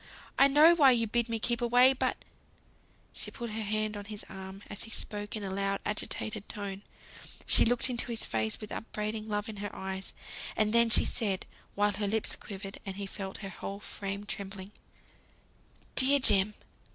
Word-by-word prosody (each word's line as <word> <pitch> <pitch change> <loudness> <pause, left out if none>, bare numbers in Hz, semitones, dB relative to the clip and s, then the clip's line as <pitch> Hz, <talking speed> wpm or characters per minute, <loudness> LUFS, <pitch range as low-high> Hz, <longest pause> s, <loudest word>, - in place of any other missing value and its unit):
I 275 - +8
know 300 +4 +7
why 295 -5 +6
you 230 -1 +2
bid 235 +2 -1
me 230 - 0
keep 235 +2 -1
away, 245 +2 +5
but 265 - -1 0.5
" - - -34
She - - -5
put 235 -2 -7
her 220 +1 -4
hand 215 0 -1
on 205 0 -7
his 210 0 -8
arm, 190 +1 -9
as 205 - -4
he - - -11
spoke 210 -1 -4
in 215 - -5
a 195 - -4
loud 195 0 -1
agitated 210 0 -4
tone; 200 -2 -5 0.6
she - - +5
looked 245 +2 +3
into 245 -2 -2
his 230 -1 -2
face 110 -1 -1
with 215 - -9
upbraiding 215 0 -4
love 210 +1 -2
in 220 -2 -7
her 205 +1 -4
eyes, 190 0 -6 0.4
and 215 0 +1
then 235 0 +4
she - - +7
said, 200 -6 -1 0.3
while 205 0 +2
her 205 +1 -3
lips 220 +1 0
quivered, 195 -1 -9
and 195 -2 -6
he 200 0 -4
felt 195 0 -6
her - - -5
whole 195 +2 -7
frame 200 0 -6
trembling: 195 -1 -6 1.2
"Dear 275 +2 +8
Jem! 205 -4 +6
210 Hz, 190 wpm, -30 LUFS, 195-230 Hz, 1.2 s, I